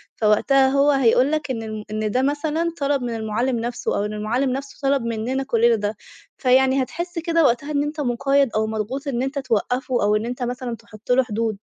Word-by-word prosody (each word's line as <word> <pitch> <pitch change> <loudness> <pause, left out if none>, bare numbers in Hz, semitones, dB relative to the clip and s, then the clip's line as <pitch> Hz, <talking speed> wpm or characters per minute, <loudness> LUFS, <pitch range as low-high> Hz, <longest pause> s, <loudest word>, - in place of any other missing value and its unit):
فوقتها 265 +5 +3
هو 280 +2 +3
هيقول 265 +1 +3
لك 305 -3 -1
إن 225 -2 -3
ال 215 -1 -6
إن 215 -1 -2
ده 255 - +1
مثلًا 305 +4 0
طلَب 280 -1 +1
من 240 -2 -3
المعلّم 225 +3 -1
نفسه، 240 +1 -2
أو 205 - 0
إن 210 - -4
المعلّم 235 +6 -1
نفسه 275 +2 -5
طلَب 275 -1 +2
مِننا 235 +4 -2
كلِّنا 235 -2 +3
ده، 205 0 -2 0.4
فيعني 260 +1 +3
هتحِس 345 +4 -5
كده 330 -1 +1
وقتها 285 +3 +1
إن 285 0 +1
أنتَ 300 +1 -5
مقيَّد 275 +1 +2
أو 220 0 +1
مضغوط، 225 +7 -4
إن 250 -2 -1
أنتَ 270 +1 -2
توقِّفه 250 0 -1
أو 210 +1 +3
إن 215 +2 -1
أنتَ 245 +1 -4
مثلًا 245 -1 -3
تحُط 215 +2 -9
له 260 +1 +5
حدود. 220 -2 -2
255 Hz, 205 wpm, -22 LUFS, 225-275 Hz, 0.4 s, له